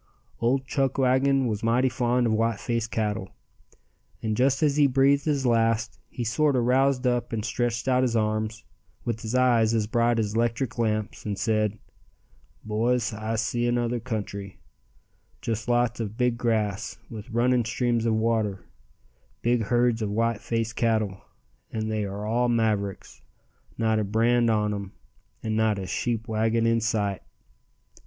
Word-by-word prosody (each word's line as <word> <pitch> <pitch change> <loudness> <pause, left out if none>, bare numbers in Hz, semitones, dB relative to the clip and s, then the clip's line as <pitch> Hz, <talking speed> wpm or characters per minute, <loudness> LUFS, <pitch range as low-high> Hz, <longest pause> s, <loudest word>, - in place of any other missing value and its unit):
Old 130 +3 +1
Chuckwagon 135 0 +2
was 110 -3 -2
mighty 120 +3 +2
fond 125 -1 +1
of 115 - +2
white 115 -1 +1
faced 115 -2 -2
cattle, 105 -3 -2 0.9
and 110 -1 0
just 135 +5 +2
as 145 -2 +3
he 145 -1 +5
breathed 140 +2 +3
his 145 -4 0
last 115 -1 +1
he 120 - -4
sorter 125 +2 +2
roused 130 +1 +2
up 120 -1 0
and 110 -2 -2
stretched 120 0 -1
out 130 -1 +3
his 125 -2 +1
arms, 110 0 -1 0.4
with 115 -1 -2
his 110 +2 -3
eyes 120 -3 +3
as 110 -2 +1
bright 115 +2 +1
as 110 -1 -1
'lectric 120 +1 -1
lamps, 110 -2 -1
and 105 -2 -3
said: 110 -2 0 0.9
"Boys, 115 +2 0
I 110 +1 -3
see 120 +2 0
another 120 0 0
country, 100 -5 -5 0.8
just 110 -1 -3
lots 120 -1 +1
of 110 -1 -4
big 125 -1 +2
grass, 110 -5 -1
with 110 -3 -9
running 120 +1 +2
streams 115 0 0
of 110 - +2
water, 110 -3 0 0.8
big 120 -2 +2
herds 120 0 +2
of 105 - -1
white 115 +1 0
face 115 -1 -2
cattle, 110 -5 0 0.5
and 110 0 -3
they 105 -1 -1
are 100 +1 -5
all 120 +3 +1
mavericks, 105 -4 -1 0.6
not 110 -1 +1
a - - +1
brand 115 +3 +2
on 105 -1 +1
'em, 100 -2 -6 0.5
and 110 -1 -1
not 110 -1 +2
a 95 - -4
sheep 115 +5 -2
wagon 110 +1 +1
in 115 0 +2
sight." 105 -4 -1
115 Hz, 155 wpm, -26 LUFS, 110-120 Hz, 0.9 s, he